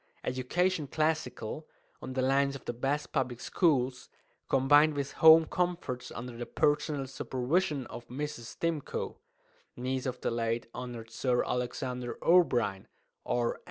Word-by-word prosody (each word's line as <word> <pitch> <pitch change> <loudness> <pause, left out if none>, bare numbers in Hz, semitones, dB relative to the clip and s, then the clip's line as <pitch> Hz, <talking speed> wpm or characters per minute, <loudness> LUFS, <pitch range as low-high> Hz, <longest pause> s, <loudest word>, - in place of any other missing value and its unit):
Education 150 +6 0
classical, 155 -2 -2 0.3
on 130 - -6
the 130 0 0
lines 140 +1 +2
of 135 - -10
the - - -2
best 135 +5 -2
Public 120 -2 -1
Schools, 130 -7 +1 0.4
combined 145 +3 +5
with 140 -1 -2
Home 160 0 +9
Comforts 175 -8 -2
under 120 +2 -7
the 120 +1 -6
personal 150 -2 +1
supervision 135 +3 -1
of 120 - -9
Mrs. 145 -1 -5
Stimcoe 165 -4 -2 0.6
(niece 130 +1 -2
of 125 -1 -3
the - - 0
late 115 0 -1
Hon. 120 -3 -6
Sir 125 +2 0
Alexander 125 0 -3
O'Brien, 120 - +3 0.4
R. 120 -1 0
130 Hz, 130 wpm, -30 LUFS, 125-150 Hz, 0.6 s, Home